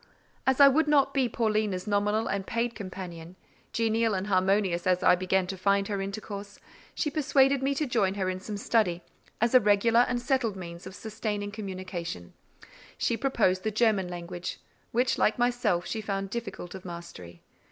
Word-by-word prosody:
As 265 +1 +3
I 280 - +10
would 300 +3 +3
not 275 -2 +3
be 265 -3 +2
Paulina's 215 -5 0
nominal 210 +1 +1
and 195 -1 -2
paid 235 +1 -1
companion, 180 -4 -8 0.4
genial 225 -1 +1
and 190 +1 -2
harmonious 190 -2 +1
as 180 -1 +2
I - - +7
began 185 +1 +1
to 190 +1 -5
find 200 +1 +2
her 200 -2 -1
intercourse, 200 0 -6 0.4
she 300 - -1
persuaded 275 -2 +3
me 275 +1 0
to 300 - 0
join 210 -7 +1
her 190 -2 -1
in 185 0 -2
some 205 +2 -6
study, 185 -5 +1 0.4
as 235 +2 +1
a 255 - +9
regular 210 +2 +3
and 245 0 +2
settled 240 -4 0
means 170 -1 -8
of 190 - -9
sustaining 210 -2 -4
communication: 185 - -6 0.6
she 235 - +1
proposed 225 -8 +1
the 220 - -1
German 215 -3 +2
language, 175 0 -6 0.3
which, 245 +2 +1
like 215 - +3
myself, 240 -8 +1
she 220 - -3
found 195 -2 -3
difficult 225 -6 -5
of 190 -1 -9
mastery. 170 - -9
205 Hz, 175 wpm, -28 LUFS, 185-235 Hz, 0.6 s, I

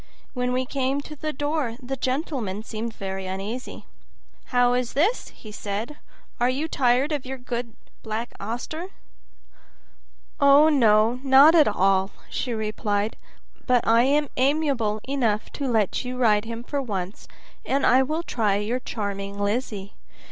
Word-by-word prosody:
When 250 -1 -1
we 255 +1 0
came 270 +1 -1
to 305 +1 -10
the 310 +1 -3
door 290 -4 -2
the 265 +1 -4
gentleman 255 - -2
seemed 225 0 -5
very 190 -1 -5
uneasy. 200 +7 -5 0.6
"How 245 -1 +3
is 250 -1 -1
this?" 385 - +1
he 215 - -12
said. 210 +7 -5 0.4
"Are 245 +1 +3
you 280 +5 -1
tired 260 0 +2
of 290 -3 -1
your 265 +1 -6
good 245 -2 -5 0.3
Black 220 +2 -4
Auster?" 245 - -5 1.5
"Oh, 285 +2 +7
no, 230 -4 +4
not 275 +3 +7
at 320 -3 +6
all," 195 -1 +2 0.2
she 250 - -2
replied, 215 -1 -1 0.5
"but 250 -2 +3
I 230 +1 +6
am 290 +1 +2
amiable 260 -6 +1
enough 235 -6 0
to 280 - -3
let 220 -5 +1
you 250 0 -5
ride 215 -4 +3
him 230 +1 -6
for 280 +3 -2
once, 195 -5 -5 0.4
and 275 +1 +1
I 255 +2 +6
will 310 +5 -1
try 215 -10 0
your 215 +5 -1
charming 200 -4 -4
Lizzie. 205 -1 -2
245 Hz, 150 wpm, -24 LUFS, 215-275 Hz, 1.5 s, Oh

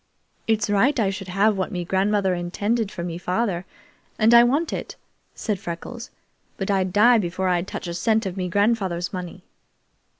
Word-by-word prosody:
"It's 220 -1 +1
right 235 +7 +2
I 200 -3 +2
should 195 -1 -7
have 200 +3 +2
what 185 - -2
me 175 -1 -3
grandmother 195 +1 +1
intinded 200 +5 -1
for 170 - -6
me 170 -1 -5
father, 185 0 -1 0.5
and 220 +1 +4
I 235 0 +9
want 285 +7 +1
it," - - -5 0.4
said 210 -4 -2
Freckles, 205 +8 -7 0.5
"but 195 0 -2
I'd 190 -2 +1
die 230 +4 +5
before 185 0 -1
I'd 180 0 0
touch - - -6
a 170 - -4
cent 220 +5 +1
of 185 -2 -4
me 185 -2 -3
grandfather's 195 -3 0
money!" 180 0 -6
195 Hz, 175 wpm, -23 LUFS, 180-220 Hz, 0.5 s, I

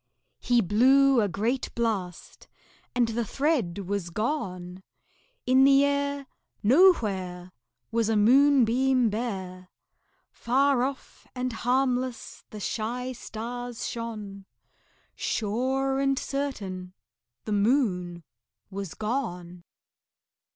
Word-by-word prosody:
He 245 -1 +2
blew 260 +6 +4
a 205 - +1
great 225 +8 -1
blast, 205 -7 -3 0.5
and 240 -2 +2
the 230 +1 -1
thread 255 - 0
was 195 -2 -3
gone; 185 - -3 0.6
In 260 +1 +5
the 275 +1 +6
air 280 0 -1 0.4
Nowhere 205 - +3 0.4
Was 225 -1 +1
a 225 - +2
moonbeam 255 0 +4
bare; 190 -5 -5 0.6
Far 265 +2 +2
off 265 +1 -5
and 250 -1 -2
harmless 250 +1 -1
the 215 - -9
shy 240 +5 -3
stars 245 0 -6
shone; 210 -4 -6 0.7
Sure 260 +5 -1
and 275 0 +1
certain 195 -12 -4 0.5
the - - -4
Moon 200 -6 +1 0.5
was 195 -3 -6
gone. 180 -7 -4
235 Hz, 95 wpm, -27 LUFS, 200-265 Hz, 0.7 s, the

